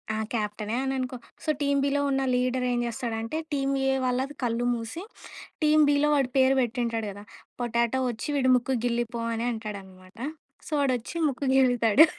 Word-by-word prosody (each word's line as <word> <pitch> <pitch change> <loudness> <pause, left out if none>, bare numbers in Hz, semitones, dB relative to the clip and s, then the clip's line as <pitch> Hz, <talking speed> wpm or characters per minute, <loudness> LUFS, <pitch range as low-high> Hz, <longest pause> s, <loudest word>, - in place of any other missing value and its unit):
ఆ! - - -2 0.2
క్యాప్టె‌నే 210 0 -2
అని 270 0 -1
అనుకో. 255 0 -3 0.3
సొ 310 - -3
టీమ్ 280 -1 +2
బిలో 285 0 +1
ఉన్న 270 0 +1
లీడర్ 250 0 +1
ఏం 240 - +1
చేస్తాడంటే 230 +3 -3 0.2
టీమ్ 275 -1 +1 0.2
ఏ - - +4
వాళ్ళ‌ది 260 +3 -1
కళ్ళు 240 0 0
మూసి 235 - -5 0.6
టీమ్ 305 0 +5
బిలో 290 +1 +3
వాడి 270 -3 +2
పేరు 265 +1 +5
పెటుంటాడు 235 -2 -1
కదా! 205 +1 -10 0.4
పోటాటో 235 +1 +1
వచ్చి 230 +3 -5
వీడు 260 -2 +3
ముక్కు 250 +1 0
గిల్లిపో 235 -1 -1
అని 230 +1 -2
అంటాడన్నమాట. 195 -3 -8 0.5
సో - - -10
వాడు 265 -2 +2
వచ్చి 235 +8 -9
ముక్కు 275 +1 -4
గిల్లుతాడు. 245 +1 +6
245 Hz, 165 wpm, -27 LUFS, 230-270 Hz, 0.6 s, గిల్లుతాడు